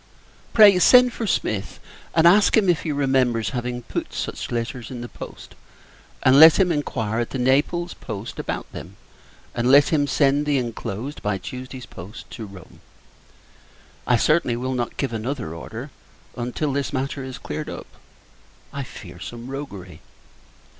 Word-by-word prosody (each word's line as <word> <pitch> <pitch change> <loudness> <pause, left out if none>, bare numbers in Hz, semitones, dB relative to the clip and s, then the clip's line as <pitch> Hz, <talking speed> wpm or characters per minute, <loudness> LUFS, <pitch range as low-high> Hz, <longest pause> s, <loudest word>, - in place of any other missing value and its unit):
Pray, 205 -4 +7
send 250 +6 +6
for 225 - -3
Smith; 105 - -2 0.4
and 165 0 +4
ask 200 +6 +6
him, 200 -4 +3
if 175 - +2
he 160 - -3
remembers 130 -6 +1
having 120 0 -4
put - - -4
such - - -4
letters 120 0 -4
in 125 -2 -7
the 120 - -6
post, - - -10 0.7
and 130 +2 +6
let 160 0 +9
him 185 -2 +3
inquire 115 -8 -2
at 120 - -1
the - - -4
Naples 145 +7 +1
post 105 -1 -7
about - - -3
them: - - -9 0.6
and 120 +1 0
let 140 +2 +6
him 145 -3 +2
send 140 +1 +2
the 145 -1 +2
inclosed, 120 +2 -4
by 105 -2 -1
Tuesday's 125 +5 -8
post, 100 0 -11
to 110 - -7
Rome. 95 -3 -14 1.3
I 125 - +4
certainly 135 -1 +2
will 130 +2 -3
not 120 -2 -3
give 135 -4 -2
another 115 - -4
order 80 - -8 0.4
until 125 +4 -2
this 140 0 -2
matter 135 0 -3
is 130 0 -7
cleared 150 +2 -5
up. - - -7 0.9
I 140 - -4
fear 90 -8 -10
some 120 +6 -8
roguery. 100 -11 -8
130 Hz, 160 wpm, -23 LUFS, 115-145 Hz, 1.3 s, let